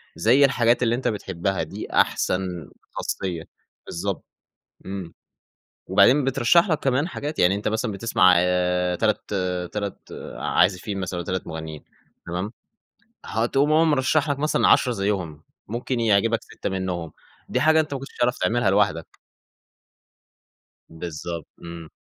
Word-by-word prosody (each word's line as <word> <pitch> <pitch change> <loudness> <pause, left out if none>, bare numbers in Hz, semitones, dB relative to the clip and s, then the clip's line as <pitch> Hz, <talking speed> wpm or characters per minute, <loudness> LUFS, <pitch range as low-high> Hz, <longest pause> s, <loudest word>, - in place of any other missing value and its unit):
زي 130 +6 +5
الحاجات 120 -2 +2
اللي 120 0 +2
أنت 130 - -2
بتحبها 95 -3 -2
دي - - -7
أحسن 90 -3 0 0.2
خاصية 90 -4 -3 0.4
بالضبط. 95 +2 -4 0.6
إمم. 95 -3 -6 0.7
وبعدين 145 +2 +5
بترشّح 135 - +3
لك 155 - +1
كمان 135 +3 +1
حاجات، 150 -3 -5
يعني 90 +2 +4
أنت 105 - -3
مثلًا 110 +1 -1
بتسمع 100 -3 +4
آآ 90 0 +1
تلات 105 +2 +1 0.5
تلات 100 -2 -3 0.4
عازفين 95 +2 +1
مثلًا 90 -1 -3
أو 85 - -5
3 95 -1 -3
مُغنّيين 80 -2 -7 0.4
تمام؟ 90 +5 -3 0.7
هتقوم 135 +6 +1
هو 160 +2 +5
مرشّح 150 +1 +2
لك 140 -1 -1
مثلًا 150 +2 +2
10 125 - +4
زيّهم، 95 -8 -2 0.2
ممكن 120 +3 -3
يعجبك 115 +1 +3
6 - - -6
منّهم. 90 -4 -3 0.4
دي - - 0
حاجة 160 0 +5
أنت 155 -2 -1
ما 140 - -3
كنتش 135 - -11
تعرف 120 0 +2
تعملها 110 +3 +1
لوحدك. 100 -5 0 1.7
بالضبط. 85 0 -6
إمم. 85 -1 -9
100 Hz, 135 wpm, -24 LUFS, 90-125 Hz, 1.7 s, زي